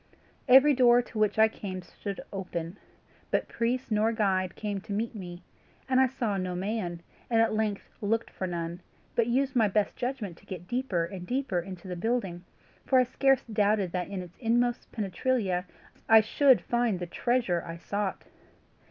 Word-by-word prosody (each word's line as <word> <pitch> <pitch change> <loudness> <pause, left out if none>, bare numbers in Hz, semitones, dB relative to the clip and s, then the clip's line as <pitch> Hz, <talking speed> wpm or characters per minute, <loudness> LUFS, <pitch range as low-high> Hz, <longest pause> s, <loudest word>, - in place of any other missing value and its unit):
Every 270 +3 +8
door 245 -2 +5
to 230 - -7
which 215 0 +2
I 220 0 +7
came 190 -4 -6
stood 200 +2 -7
open, 180 -1 -5 0.5
but - - 0
priest 245 +2 -2
nor 215 +1 +3
guide 190 -5 0
came 205 -2 -3
to 205 - -10
meet 220 +4 -1
me, 175 -4 -8 0.4
and 260 -1 +3
I 265 - +5
saw 235 -6 -2
no 185 -1 -2
man, 180 -3 -3 0.3
and 230 -2 +3
at 225 -1 +3
length 215 -2 -1
looked 225 +2 0
for 185 - -4
none, 170 0 -4 0.3
but 230 -1 +2
used 260 +2 +1
my 225 -3 +4
best 205 +1 0
judgment 245 -8 -4
to - - -20
get 180 -2 -7
deeper 240 -9 0
and 180 0 -8
deeper 255 -7 0
into 185 +1 -8
the 180 - -4
building, 190 -3 -2 0.4
for 265 - +3
I 255 - +6
scarce 270 +1 +2
doubted 210 -4 +1
that 180 0 -2
in 195 -2 -4
its 180 0 -15
inmost 240 0 0
penetralia 200 -2 -1 0.4
I 225 0 +9
should 260 +4 +4
find 240 -4 0
the 175 - -4
treasure 230 -2 0
I 165 0 -7
sought. 200 +3 -3
210 Hz, 180 wpm, -28 LUFS, 185-240 Hz, 0.5 s, I